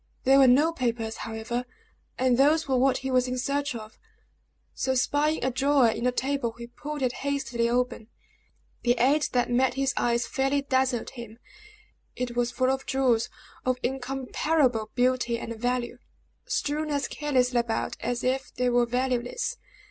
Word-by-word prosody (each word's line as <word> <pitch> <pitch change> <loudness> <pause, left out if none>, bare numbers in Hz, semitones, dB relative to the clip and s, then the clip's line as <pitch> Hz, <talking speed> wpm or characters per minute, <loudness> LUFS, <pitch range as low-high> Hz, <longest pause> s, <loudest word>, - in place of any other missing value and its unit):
There 270 +1 +6
were 270 - +7
no 290 +7 +5
papers, 230 -5 -2
however, 225 +2 -4 0.5
and 255 -1 +3
those 300 +5 +3
were 265 - +1
what 260 +1 +3
he 265 - -1
was 255 0 +3
in 255 0 -2
search 280 +1 -1
of; 215 -1 -9 0.7
so 260 0 -1
spying 290 +4 +1
a 260 - +1
drawer 270 -1 +3
in 235 - -2
the 250 - +3
table, 260 -2 -1
he 235 - -7
pulled 290 +4 -6
it 250 - +2
hastily 270 -4 -1
open. 245 -2 -1 0.7
The 240 0 +2
sight 280 +6 +3
that 245 -1 +1
met 250 0 +2
his 270 -1 0
eyes 235 0 +1
fairly 275 +1 0
dazzled 260 -3 0
him. 235 -3 -10 0.8
It 245 -1 -3
was 240 0 +1
full 255 +1 +1
of 270 0 -3
jewels 255 -4 +2 0.3
of 255 0 +1
incomparable 265 -1 0
beauty 245 -1 +1
and 230 0 -6
value, 245 +1 -2 0.5
strewn 300 +1 -1
as 285 -1 -1
carelessly 255 -4 +1
about 235 -1 -2
as 240 +1 -2
if 260 +1 -1
they 250 0 +1
were 240 0 +3
valueless. 250 - -1
255 Hz, 165 wpm, -27 LUFS, 240-270 Hz, 0.8 s, were